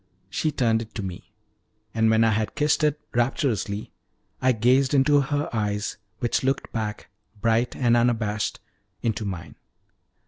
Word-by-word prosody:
She 155 - 0
turned 115 -5 +2
it 110 -1 -10
to 105 - -3
me, 90 -2 -7 0.6
and 110 0 +3
when 110 0 +4
I 115 - +4
had 110 0 -1
kissed 150 +1 +2
it 150 0 +2
rapturously, 115 - 0 0.5
I 130 - +4
gazed 130 +4 +3
into 140 +1 +5
her 145 +1 -1
eyes, 105 -1 -1 0.2
which 120 0 0
looked 135 +1 -1
back, 110 -2 -4 0.3
bright 115 +2 +1
and 120 -3 +3
unabashed, 110 -3 +1 0.4
into 110 -2 -1
mine. 90 -5 -5
115 Hz, 145 wpm, -25 LUFS, 110-135 Hz, 0.6 s, into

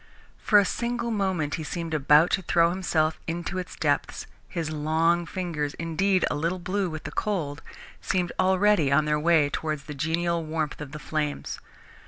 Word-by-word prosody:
For 210 - +4
a 200 - +6
single 235 +2 -2
moment 190 -8 -1
he - - -4
seemed 165 +1 -4
about 150 +2 +5
to 190 - +2
throw 170 -1 +3
himself 160 -4 0
into 175 +3 -3
its 180 - -7
depths - - -1 0.2
his 165 -3 -3
long 160 +3 +1
fingers, 165 -6 -3
indeed, 180 +3 +1
a - - +1
little 165 +5 -1
blue 185 +1 -1
with 155 -1 -6
the - - -6
cold, 165 -8 -2 0.4
seemed 180 -2 -1
already 185 -5 +3
on 150 +2 +4
their 150 0 +1
way 160 -2 +4
towards 155 -1 -3
the 150 +1 -7
genial 165 +3 -1
warmth 155 0 -3
of 145 -2 -7
the 150 - -6
flames. 150 -1 -3
165 Hz, 175 wpm, -26 LUFS, 155-185 Hz, 0.4 s, a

